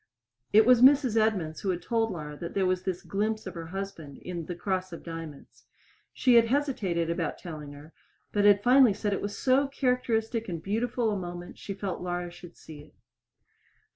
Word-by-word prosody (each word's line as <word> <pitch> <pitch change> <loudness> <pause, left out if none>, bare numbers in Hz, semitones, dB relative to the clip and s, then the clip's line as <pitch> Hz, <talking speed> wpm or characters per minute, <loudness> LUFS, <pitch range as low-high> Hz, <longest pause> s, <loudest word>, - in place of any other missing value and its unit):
It 215 +1 +6
was 250 -1 +6
Mrs. 265 -3 +6
Edmunds 200 -8 0
who 195 - -2
had 180 -1 -2
told 225 -1 0
Laura 150 -5 -6
that 170 +3 -7
there 195 -1 +2
was 185 0 +1
this 185 -2 -3
glimpse 215 +2 -2
of - - -6
her 165 -2 -7
husband 180 -6 -7
in 170 -3 -6
"The 175 - -4
Cross 185 0 -2
of 170 - -9
Diamonds." 165 -4 -9 0.5
She 255 - +2
had 230 -1 +7
hesitated 220 - 0
about 170 -2 -2
telling 150 -4 -8
her, 145 +3 -13 0.4
but 205 - +1
had 205 0 +5
finally 250 -3 +6
said 205 -1 -1
it - - -2
was 205 0 -4
so 270 +2 +3
characteristic 240 -4 -1
and 170 -2 -3
beautiful 225 +5 -1
a 205 - -2
moment 175 -1 -8
she 195 - -6
felt 195 -2 -4
Laura 175 -1 -3
should 175 0 -13
see 155 -2 -12
it. 150 - -19
195 Hz, 195 wpm, -28 LUFS, 170-225 Hz, 0.5 s, had